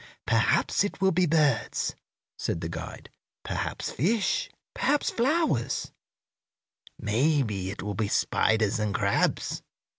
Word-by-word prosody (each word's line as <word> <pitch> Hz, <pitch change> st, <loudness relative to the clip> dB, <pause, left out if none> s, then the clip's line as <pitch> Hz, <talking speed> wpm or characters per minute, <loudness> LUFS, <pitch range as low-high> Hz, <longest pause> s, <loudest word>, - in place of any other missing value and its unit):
"Perhaps -, -, +2 dB
it 205 Hz, -, -4 dB
will 190 Hz, 0 st, +3 dB
be 180 Hz, 0 st, +2 dB
birds," 150 Hz, -7 st, +1 dB, 0.4 s
said -, -, -2 dB
the 80 Hz, -, -3 dB
guide; 80 Hz, -1 st, -7 dB, 0.3 s
"perhaps -, -, -3 dB
fish; 220 Hz, -, +1 dB, 0.2 s
perhaps 295 Hz, -, +1 dB
flowers; 260 Hz, -, 0 dB, 1.1 s
maybe 110 Hz, -5 st, +1 dB
it 100 Hz, -, -6 dB
will 105 Hz, 0 st, -3 dB
be 105 Hz, +1 st, -1 dB
spiders 110 Hz, +1 st, +2 dB
and 105 Hz, -1 st, -1 dB
crabs. 100 Hz, -2 st, +1 dB
120 Hz, 115 wpm, -27 LUFS, -, 1.1 s, will